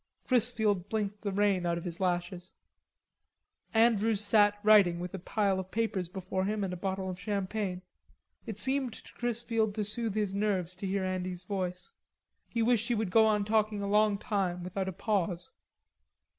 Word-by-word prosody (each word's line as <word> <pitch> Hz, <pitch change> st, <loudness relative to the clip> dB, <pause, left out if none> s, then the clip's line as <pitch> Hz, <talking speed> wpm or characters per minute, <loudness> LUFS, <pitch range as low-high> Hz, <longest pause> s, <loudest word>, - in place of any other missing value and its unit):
Chrisfield 220 Hz, -6 st, +2 dB
blinked 210 Hz, -2 st, -2 dB
the 205 Hz, -, -2 dB
rain 195 Hz, -2 st, +2 dB
out 170 Hz, 0 st, 0 dB
of 170 Hz, -, -5 dB
his 175 Hz, -1 st, -6 dB
lashes. 180 Hz, 0 st, -2 dB, 1.2 s
Andrews 225 Hz, -2 st, +3 dB
sat 205 Hz, 0 st, +4 dB
writing 200 Hz, -5 st, +6 dB
with 180 Hz, 0 st, -5 dB
a 190 Hz, -, -4 dB
pile 195 Hz, +1 st, 0 dB
of 190 Hz, 0 st, -6 dB
papers 205 Hz, -6 st, -1 dB
before 185 Hz, 0 st, -3 dB
him 210 Hz, 0 st, -1 dB
and 185 Hz, -2 st, -2 dB
a -, -, -3 dB
bottle 190 Hz, +1 st, -3 dB
of 185 Hz, -1 st, -5 dB
champagne. 200 Hz, -2 st, -2 dB, 0.6 s
It 220 Hz, -3 st, -5 dB
seemed 260 Hz, +1 st, 0 dB
to -, -, -13 dB
Chrisfield 230 Hz, -3 st, -1 dB
to 215 Hz, -, 0 dB
soothe 220 Hz, 0 st, -3 dB
his 210 Hz, -3 st, 0 dB
nerves 195 Hz, -4 st, 0 dB
to 195 Hz, -, -4 dB
hear 195 Hz, 0 st, -1 dB
Andy's 185 Hz, -1 st, -3 dB
voice. 180 Hz, -, -4 dB, 0.6 s
He 230 Hz, -1 st, 0 dB
wished 235 Hz, -1 st, +2 dB
he 240 Hz, -, +1 dB
would 215 Hz, -4 st, -1 dB
go 220 Hz, +1 st, +6 dB
on 210 Hz, -2 st, +2 dB
talking 215 Hz, -1 st, +1 dB
a -, -, -2 dB
long 210 Hz, 0 st, +3 dB
time 190 Hz, -5 st, -2 dB
without 190 Hz, +1 st, -3 dB
a -, -, -3 dB
pause. 180 Hz, -3 st, -1 dB
200 Hz, 175 wpm, -30 LUFS, 185-220 Hz, 1.2 s, writing